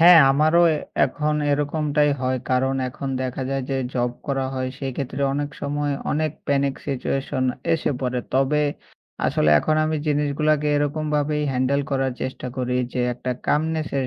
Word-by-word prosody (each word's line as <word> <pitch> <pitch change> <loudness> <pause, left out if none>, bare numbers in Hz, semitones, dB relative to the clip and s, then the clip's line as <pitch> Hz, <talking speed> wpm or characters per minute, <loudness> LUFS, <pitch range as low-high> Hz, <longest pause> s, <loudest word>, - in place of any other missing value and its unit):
হ্যাঁ। 175 +1 +9
আমারও 155 +4 +4 0.4
এখন 150 +1 -1 0.2
এরকমটাই 150 0 +1
হয়। 130 0 0
কারণ 130 +1 +2
এখন 135 +2 -6
দেখা 130 +1 -3
যায় 135 -1 -1
যে 135 - 0 0.2
জব 120 -1 +1 0.2
করা 135 -1 0
হয় 130 0 -2
সেক্ষেত্রে 135 0 -3
অনেক 145 +1 -2
সময় 145 0 -1 0.2
অনেক 155 +1 0 0.2
প্যানিক 140 -1 +1
সিচুয়েশন 135 0 -1 0.3
এসে 160 - -1
পড়ে। 125 -1 -1
তবে 135 +3 +3 0.7
আসলে 75 - +2
এখন 155 - +1
আমি 155 0 0
জিনিসগুলাকে 150 0 +1
এরকমভাবেই 150 0 0
হ্যান্ডেল 130 +2 +1
করার 135 -1 0
চেষ্টা 130 0 -4
করি। 125 -1 -1 0.2
যে 125 - -1
একটা 125 +1 -4 0.2
কামনেস 155 +1 +1
এর 130 - -1
140 Hz, 150 wpm, -23 LUFS, 130-150 Hz, 0.7 s, হ্যাঁ